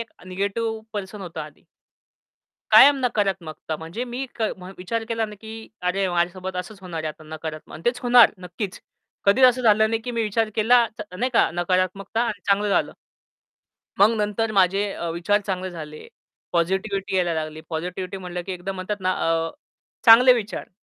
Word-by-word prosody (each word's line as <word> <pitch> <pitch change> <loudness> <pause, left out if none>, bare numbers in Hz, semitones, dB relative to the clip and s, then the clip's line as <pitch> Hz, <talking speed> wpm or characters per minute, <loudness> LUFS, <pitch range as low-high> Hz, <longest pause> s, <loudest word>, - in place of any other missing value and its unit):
एक 230 - -7 0.2
negative 205 +4 -2
person 205 0 -6
होतो 170 -4 -6
आधी. 150 -1 -11 1.1
कायम 285 0 +9
नकारात्मकता 190 -9 -2
म्हणजे 165 +10 -5
मी 250 +2 -4
के 220 - +1 0.3
विचार 225 +5 -3
केला 225 -1 0
नाही 210 -1 -11
की 220 0 -9
अरे, 190 +2 0
माझ्यासोबत 180 +2 -1
असंच 195 +3 -6
होणार 165 -4 -5
आहे - - -1
आता 155 0 -8
नकारात्मक 155 0 -8
आणि 155 - -10
तेच 245 +1 +1
होणार 245 -1 +7
नक्कीच. 180 +2 -6 0.5
कधीच 245 +6 +6
असं 255 0 +4
झालं 220 -1 +4
नाही 225 0 -1
की 245 - -5
मी 230 -1 -1
विचार 220 +1 0
केला 235 +2 +5
चा 210 - -4
नाही 255 +5 0
का - - +4
नकारात्मकता 185 +4 0
आणि 220 -5 -2
चांगलं 205 +1 +2
झालं. 200 - +1 1.1
मग 205 +3 +7
नंतर 210 +1 -1
माझे 195 +1 +2
अ, 170 - -4
विचार 175 +5 +1
चांगले 185 -1 -3
झाले. 155 -3 -9 0.4
पॉझिटिव्हिटी 190 +3 -1
यायला 175 -2 +1
लागली. 155 0 -4
पॉझिटिव्हिटी 180 +3 -4
म्हटलं 180 -1 -5
की 190 - -4
एकदम 185 +2 -5
म्हणतात 190 +3 -4
ना, 185 - +1
अ 165 -3 0 0.6
चांगले 250 +2 +9
विचार. 225 -3 -4
195 Hz, 170 wpm, -23 LUFS, 175-220 Hz, 1.1 s, कायम